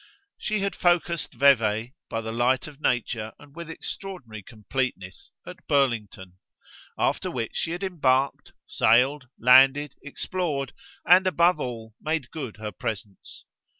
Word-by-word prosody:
She 215 Hz, -1 st, -1 dB
had 200 Hz, 0 st, -1 dB
focussed 175 Hz, -2 st, +1 dB
Vevey, 115 Hz, -4 st, +3 dB, 0.2 s
by 115 Hz, -, -2 dB
the 110 Hz, 0 st, -5 dB
light 120 Hz, +2 st, +1 dB
of 150 Hz, -1 st, -12 dB
nature 115 Hz, -4 st, -1 dB
and 145 Hz, 0 st, -17 dB
with 170 Hz, -1 st, -8 dB
extraordinary 165 Hz, -, -7 dB
completeness, 110 Hz, -3 st, -5 dB, 0.2 s
at -, -, -12 dB
Burlington; 105 Hz, -9 st, 0 dB, 0.6 s
after -, -, 0 dB
which 115 Hz, -2 st, -3 dB
she -, -, -1 dB
had 175 Hz, +3 st, -4 dB
embarked, 140 Hz, -7 st, 0 dB
sailed, 130 Hz, +4 st, +3 dB
landed, 135 Hz, +4 st, +5 dB
explored 145 Hz, -2 st, -3 dB, 0.3 s
and, 185 Hz, +2 st, +6 dB
above 175 Hz, -2 st, +3 dB
all, 115 Hz, -4 st, -6 dB
made 155 Hz, -5 st, -2 dB
good 130 Hz, -9 st, -6 dB
her 105 Hz, 0 st, -5 dB
presence. 100 Hz, 0 st, -7 dB
130 Hz, 130 wpm, -25 LUFS, 115-160 Hz, 0.6 s, and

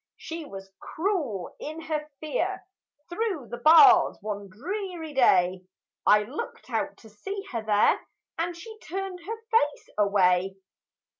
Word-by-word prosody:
She 325 Hz, -1 st, -7 dB
was 195 Hz, -5 st, -10 dB
cruel 310 Hz, -, -2 dB
in 310 Hz, +2 st, -6 dB
her 300 Hz, -1 st, -3 dB
fear; 360 Hz, +5 st, -2 dB, 0.4 s
Through 355 Hz, -, -3 dB
the 240 Hz, -, -5 dB
bars 340 Hz, -, +7 dB
one 205 Hz, -1 st, -5 dB
dreary 340 Hz, -, -5 dB
day, 185 Hz, -8 st, +3 dB, 0.4 s
I 210 Hz, 0 st, +6 dB
looked 250 Hz, +8 st, -7 dB
out 295 Hz, 0 st, -2 dB
to 220 Hz, -, -16 dB
see 390 Hz, -, -6 dB
her 230 Hz, -3 st, -2 dB
there, 210 Hz, -1 st, +3 dB, 0.4 s
And 340 Hz, +1 st, -2 dB
she 440 Hz, +4 st, -11 dB
turned 380 Hz, 0 st, -5 dB
her 425 Hz, +7 st, -6 dB
face 295 Hz, -11 st, +1 dB
away! 190 Hz, -2 st, +3 dB
300 Hz, 135 wpm, -27 LUFS, -, 0.4 s, bars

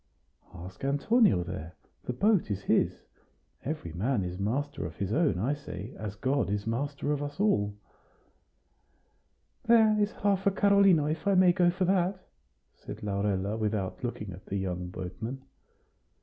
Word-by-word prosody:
"Ask 90 Hz, +5 st, -10 dB
Antonio 140 Hz, -, +3 dB
there; 85 Hz, -2 st, -7 dB, 0.3 s
the -, -, -1 dB
boat 200 Hz, -, +2 dB
is 100 Hz, -1 st, -3 dB
his. -, -, +1 dB, 0.6 s
Every 145 Hz, -, -4 dB
man 105 Hz, +4 st, 0 dB
is 90 Hz, +1 st, -5 dB
master 130 Hz, +9 st, -2 dB
of 80 Hz, -, -10 dB
his 100 Hz, +3 st, -3 dB
own, 155 Hz, -, +2 dB
I 120 Hz, +10 st, 0 dB
say, 125 Hz, -5 st, -7 dB
as 105 Hz, -2 st, -6 dB
God 130 Hz, +2 st, 0 dB
is 100 Hz, 0 st, -2 dB
master 140 Hz, +5 st, -2 dB
of 145 Hz, -1 st, -1 dB
us 145 Hz, +2 st, -6 dB
all." 105 Hz, -, +2 dB, 1.9 s
"There 220 Hz, -2 st, +5 dB
is 210 Hz, +1 st, +1 dB
half 200 Hz, -1 st, 0 dB
a -, -, +5 dB
carlino, 195 Hz, -5 st, +4 dB
if 155 Hz, +5 st, -2 dB
I 200 Hz, -, +4 dB
may 180 Hz, -1 st, +6 dB
go 175 Hz, -1 st, +4 dB
for 180 Hz, +2 st, 0 dB
that?" 185 Hz, 0 st, 0 dB, 0.5 s
said -, -, -10 dB
Laurella, 100 Hz, 0 st, -1 dB
without 105 Hz, 0 st, -2 dB
looking 105 Hz, -5 st, -4 dB
at 90 Hz, +2 st, -12 dB
the 100 Hz, -, -2 dB
young 90 Hz, -2 st, -3 dB
boatman. 100 Hz, +9 st, -6 dB
130 Hz, 155 wpm, -29 LUFS, -, 1.9 s, may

